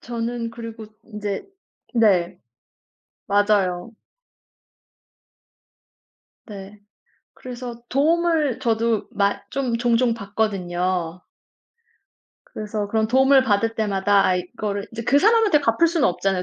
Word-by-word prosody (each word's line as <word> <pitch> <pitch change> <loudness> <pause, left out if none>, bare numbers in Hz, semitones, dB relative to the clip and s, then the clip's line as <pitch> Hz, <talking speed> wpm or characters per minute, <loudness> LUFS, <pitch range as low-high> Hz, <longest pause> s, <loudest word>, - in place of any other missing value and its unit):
저는 235 0 -4
그리고 230 -1 -9 0.2
인제 210 -3 -5 0.5
네 195 -7 +2 0.9
맞아요. 200 -2 +1 2.6
네. 200 -1 -10 0.6
그래서 245 -1 -8
도움을 315 -1 +1
저도 230 -1 0
마 200 0 +1
좀 255 -4 -1
종종 240 0 +2
받거든요. 185 -5 -2 1.2
그래서 210 -1 -5
그런 220 +1 +1
도움을 265 +2 +5
받을 225 0 +1
때마다 200 -2 +2
아 185 - +2
이거를 200 +3 -4
이제 230 - -5
그 280 +5 +3
사람한테 435 -5 +4
갚을 280 +6 +2
수는 330 -3 +2
없잖아요 185 +1 -1
220 Hz, 220 characters per minute, -22 LUFS, 200-245 Hz, 2.6 s, 도움을